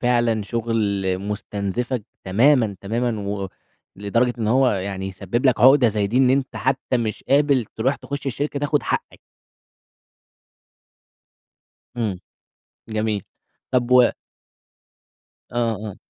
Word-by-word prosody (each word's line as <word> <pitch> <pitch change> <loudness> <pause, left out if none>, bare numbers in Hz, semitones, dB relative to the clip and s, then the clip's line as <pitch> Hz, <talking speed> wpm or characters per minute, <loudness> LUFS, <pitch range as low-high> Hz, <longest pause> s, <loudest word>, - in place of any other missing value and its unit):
فعلًا 120 -3 +2
شغل 105 -4 -1
مستنزفك 105 +4 -3 0.2
تمامًا، 115 +1 +3
تمامًا 115 +2 -1
و 100 -1 -3 0.5
لدرجة 115 +5 +1
إن 110 - -1
هو 130 +2 +4
يعني 95 0 -3
يسبب 100 +7 -2
لك 125 -4 +3
عقدة 130 0 +7
زي 105 -1 0
دي، 110 +5 -2
إن 130 -1 +5
أنت 135 0 0
حتى 130 -1 0
مش 115 -3 -3
قابل 140 -3 +3
تروح 130 +5 +1
تخش 140 -1 -6
الشركة 140 +2 -2
تاخد 145 0 0
حقّك. - - -3 2.8
إمم، 110 -6 -2 0.7
جميل. 110 -2 -1 0.5
طَب 125 -1 +1
و 125 -1 +6 1.4
آه، 115 -2 0
آه. 100 - -7
115 Hz, 115 wpm, -22 LUFS, 100-130 Hz, 2.8 s, عقدة